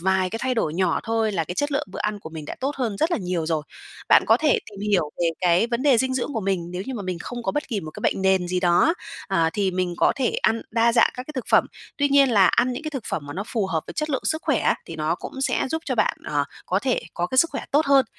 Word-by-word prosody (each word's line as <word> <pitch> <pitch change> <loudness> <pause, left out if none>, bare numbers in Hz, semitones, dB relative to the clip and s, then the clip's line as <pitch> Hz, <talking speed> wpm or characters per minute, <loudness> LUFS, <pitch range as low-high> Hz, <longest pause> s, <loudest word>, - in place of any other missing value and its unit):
vài 190 0 +1
cái 225 - -4
thay 260 -1 0
đổi 160 -9 -1
nhỏ 185 +1 +1
thôi, 225 -1 0
là 170 -4 0
cái 175 - -6
chất 290 +7 -1
lượng 290 +2 -1
bữa - - -6
ăn 210 0 -1
của 160 - -10
mình 160 -2 -7
đã - - -6
tốt 275 +3 -2
hơn 235 -6 -2
rất 320 - +1
là 340 - +1
nhiều 180 -5 -2
rồi. 160 -2 0 0.5
Bạn - - +7
có - - +6
thể 305 -2 +2
tìm 200 -1 -11
hiểu 175 -7 +2
về 175 - +2
cái 180 +4 +3
vấn 235 +1 -2
đề 275 -5 +4
dinh 260 +2 +1
dưỡng 265 +3 -2
của 225 - -2
mình, 190 -4 -2
nếu 180 +1 -4
như 265 - -4
mà 215 - -4
mình 185 -2 -3
không 240 +7 -6
có - - -1
bất 295 -1 -2
kỳ 215 -5 -2
một 155 - -7
cái - - -10
bệnh 190 - 0
nền 190 -2 +2
gì 180 0 0
đó 175 -1 +4
á, 330 - +4 0.4
ờ, 165 -1 +2
thì 200 -2 0
mình 180 -1 -1
có - - +3
thể 260 -4 +1
ăn 225 0 +2
đa 230 +1 +3
dạng 230 -1 +5
các 250 - -5
cái 305 - -7
thực 255 - -3
phẩm, - - +5 0.3
tuy 285 0 +2
nhiên 280 -1 +5
là 200 -4 +5
ăn 250 +1 +2
những 250 +5 -5
cái 310 - -4
thực 270 -6 -5
phẩm 155 - -2
mà 145 - -6
nó 190 - -3
phù 220 -5 -1
hợp 165 -4 -1
với - - -8
chất 305 0 -2
lượng 265 - -1
sức 315 0 0
khỏe 285 -7 +1
á, - - +3
thì 165 - -7
nó 155 +1 0
cũng 265 - -8
sẽ 270 - +1
giúp 320 +1 -2
cho 260 - -1
bạn, 225 - +1
ờ, 145 -1 0 0.2
có 185 - +1
thể 255 +3 0
có 175 - -1
cái 260 - -1
sức 335 - +5
khỏe 275 - -5
tốt 295 +2 +3
hơn. 275 -1 +5
215 Hz, 315 wpm, -23 LUFS, 180-265 Hz, 0.5 s, Bạn